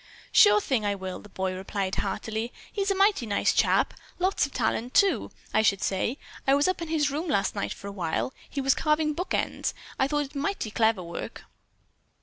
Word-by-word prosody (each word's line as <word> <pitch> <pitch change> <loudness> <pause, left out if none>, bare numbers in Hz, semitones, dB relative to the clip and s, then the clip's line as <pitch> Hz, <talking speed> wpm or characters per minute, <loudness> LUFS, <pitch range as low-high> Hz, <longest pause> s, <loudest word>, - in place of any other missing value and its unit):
"Sure 415 0 +7
thing, 260 - 0
I 205 -1 0
will!" 190 -1 -5
the 210 - -14
boy 190 -1 -2
replied 190 +1 -3
heartily. 220 +2 -2 0.2
"He's 400 -1 -1
a 395 - +2
mighty 390 - +3
nice 205 - +2
chap. - - +3 0.2
Lots 370 -4 +1
of - - -17
talent, 240 0 -1
too, 400 -1 +3 0.2
I - - +4
should 200 -3 +2
say. 200 +7 0 0.3
I 270 - +6
was 285 +3 +3
up 370 -1 0
in 335 - -3
his 300 -3 +1
room 310 +5 -3
last 200 -10 +1
night 200 - -3
for - - -8
a 200 - -4
while. 185 +6 -2 0.2
He 280 - -3
was 270 0 +4
carving 305 0 +1
book 360 +5 -2
ends. - - -1 0.2
I 265 - +3
thought 295 0 0
it 270 - -14
mighty 290 - -2
clever 220 -4 +2
work." 170 0 -7
260 Hz, 205 wpm, -27 LUFS, 200-310 Hz, 0.3 s, Sure